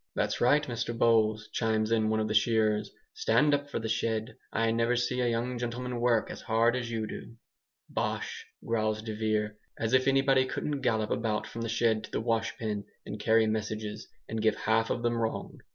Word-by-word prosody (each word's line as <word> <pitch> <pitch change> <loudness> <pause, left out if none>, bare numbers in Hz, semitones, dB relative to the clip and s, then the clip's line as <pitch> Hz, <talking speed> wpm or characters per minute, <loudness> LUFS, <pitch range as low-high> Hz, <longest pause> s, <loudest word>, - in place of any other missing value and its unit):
"That's - - -1
right, 145 +5 +4
Mr 120 -2 -3
Bowles," 110 -2 +3
chimes 110 -1 +1
in 110 -1 +2
one 110 0 +1
of 110 - 0
the 110 - -1
shearers, 110 0 +2 0.2
"stand 290 - +3
up 145 0 0
for - - -3
the 115 - -3
shed. 110 +1 -1 0.2
I 115 0 +1
never 115 +2 +2
see 125 +1 0
a 120 - +2
young 120 +1 -1
gentleman 120 +1 -3
work 120 -2 +2
as - - -8
hard 115 +1 +2
as 120 -2 -3
you 110 -2 -2
do." 115 - -8 0.5
"Bosh!" - - -3 0.2
growls 110 -1 0
de 110 -1 -4
Vere, 105 -1 -1 0.2
"as 115 +1 -1
if 130 0 +4
anybody 135 -1 +4
couldn't 145 +1 -3
gallop 110 -4 0
about 110 -2 0
from 115 +2 -7
the 115 - -2
shed 110 -1 +2
to - - -14
the - - -2
washpen, 115 -2 -1 0.2
and 105 - -6
carry 110 +1 +4
messages, 110 0 -3 0.2
and 110 -1 -3
give 110 -1 +3
half 110 +1 +1
of 120 - -2
them 120 0 +1
wrong! 115 -1 -3
115 Hz, 200 wpm, -29 LUFS, 110-120 Hz, 0.5 s, right